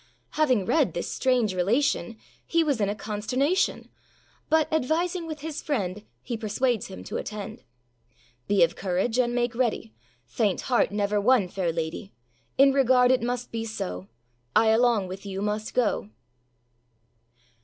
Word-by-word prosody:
Having 255 Hz, -10 st, +2 dB
read 320 Hz, -, +2 dB
this -, -, -3 dB
strange 250 Hz, -6 st, +1 dB
relation, 210 Hz, +1 st, 0 dB, 0.3 s
He 335 Hz, -1 st, +3 dB
was 285 Hz, -8 st, 0 dB
in 200 Hz, -, +2 dB
a 205 Hz, -, -2 dB
consternation; 250 Hz, -, -1 dB, 0.6 s
But, 315 Hz, -1 st, +3 dB
advising 330 Hz, +4 st, 0 dB
with 310 Hz, -2 st, -6 dB
his 315 Hz, 0 st, -5 dB
friend, 205 Hz, -, -2 dB, 0.2 s
He 240 Hz, -, -4 dB
persuades 225 Hz, +1 st, -1 dB
him 90 Hz, -, -9 dB
to -, -, -5 dB
attend. 215 Hz, +1 st, -6 dB, 0.9 s
âBe 205 Hz, -1 st, +5 dB
of 255 Hz, -, +1 dB
courage, 195 Hz, +6 st, -1 dB
and 240 Hz, -1 st, +1 dB
make 240 Hz, 0 st, 0 dB
ready, 230 Hz, -, -1 dB, 0.3 s
Faint 185 Hz, -, 0 dB
heart 245 Hz, -5 st, +1 dB
never 205 Hz, 0 st, 0 dB
won 230 Hz, -3 st, +4 dB
fair 180 Hz, -1 st, -2 dB
lady; 165 Hz, +4 st, -5 dB, 0.4 s
In 275 Hz, 0 st, +6 dB
regard 255 Hz, -2 st, +4 dB
it 255 Hz, -, +3 dB
must 245 Hz, +1 st, -3 dB
be 225 Hz, -1 st, -3 dB
so, 95 Hz, -, -5 dB, 0.5 s
I 220 Hz, 0 st, +5 dB
along 225 Hz, -3 st, +3 dB
with 190 Hz, +2 st, -8 dB
you 195 Hz, -1 st, -5 dB
must 210 Hz, +1 st, -3 dB
go. 215 Hz, -, +1 dB
225 Hz, 150 wpm, -26 LUFS, 200-260 Hz, 0.9 s, In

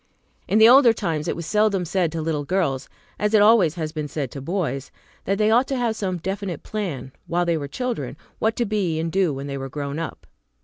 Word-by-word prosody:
In 210 Hz, -, +2 dB
the 220 Hz, +1 st, +8 dB
older 250 Hz, -1 st, +7 dB
times 160 Hz, -7 st, -2 dB
it -, -, -1 dB
was 170 Hz, -, -6 dB
seldom 200 Hz, +1 st, +2 dB
said 175 Hz, -1 st, 0 dB
to 160 Hz, -1 st, -3 dB
little 155 Hz, -2 st, -1 dB
girls, 140 Hz, -6 st, -1 dB, 0.3 s
as 210 Hz, +1 st, +2 dB
it 210 Hz, -, +6 dB
always 205 Hz, -7 st, +5 dB
has 160 Hz, -3 st, -3 dB
been 155 Hz, -2 st, -4 dB
said 140 Hz, -4 st, -4 dB
to 140 Hz, -, -7 dB
boys, 140 Hz, -4 st, -2 dB, 0.4 s
that 195 Hz, +1 st, 0 dB
they 215 Hz, +1 st, +3 dB
ought 245 Hz, +4 st, +4 dB
to 270 Hz, -, -1 dB
have 235 Hz, -3 st, 0 dB
some 185 Hz, -4 st, -2 dB
definite 190 Hz, -1 st, -4 dB
plan, 165 Hz, -, -4 dB, 0.2 s
while 175 Hz, +1 st, +1 dB
they 170 Hz, -1 st, +1 dB
were 145 Hz, -3 st, -3 dB
children, 245 Hz, -, -4 dB, 0.2 s
what 220 Hz, +1 st, +1 dB
to 240 Hz, -, 0 dB
be 195 Hz, -7 st, -1 dB
and 165 Hz, 0 st, -2 dB
do 190 Hz, -3 st, +2 dB
when 135 Hz, 0 st, -5 dB
they 140 Hz, -1 st, -4 dB
were 135 Hz, 0 st, -5 dB
grown 140 Hz, +2 st, -4 dB
up. 165 Hz, -, -6 dB
175 Hz, 230 wpm, -23 LUFS, 150-210 Hz, 0.4 s, the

